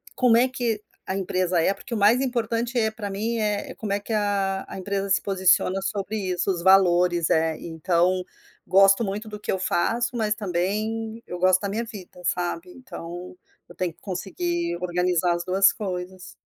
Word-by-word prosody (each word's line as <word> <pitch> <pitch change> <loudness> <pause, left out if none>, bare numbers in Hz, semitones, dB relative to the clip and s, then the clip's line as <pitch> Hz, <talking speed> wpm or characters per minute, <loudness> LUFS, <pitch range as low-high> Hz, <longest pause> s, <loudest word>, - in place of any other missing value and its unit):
como 245 -3 +4
é 245 +2 +4
que 240 -5 -2 0.3
a 190 - -2
empresa 185 -2 0
é, 180 - +3
porque 240 - -9
o - - 0
mais 210 +4 +5
importante, 235 -1 -1
eh, 220 -1 +2
pra 215 -2 -6
mim 220 +4 -2
é 210 -2 -2
como 210 -2 -3
é 200 - 0
que 220 +2 -5
a 200 -2 0
a - - -8
empresa 195 +1 -2
se 195 - +3
posiciona 190 -1 +2
sobre 200 +1 -3
isso, 185 -1 -1
os 175 -2 -3
valores, 180 -3 +4
é, 160 0 +2
então 175 +2 0 0.4
gosto 195 +4 +5
muito 210 +2 -4
do 210 0 -7
que - - -3
eu 190 - -1
faço, 235 +7 0
mas 215 -2 +1
também 215 +4 -2
eu 180 - -5
gosto 185 +1 +4
da 200 - -2
minha 220 +4 -2
vida, 195 -5 -11
sabe. 175 0 -2
Então 180 -9 -9 0.3
eu - - -13
tenho 180 -3 -2
que - - -31
conseguir 175 -2 -3
organizar 180 -1 +1
as 170 - -4
2 195 +1 +4
coisas. 185 -2 -6
195 Hz, 185 wpm, -24 LUFS, 180-215 Hz, 0.4 s, mais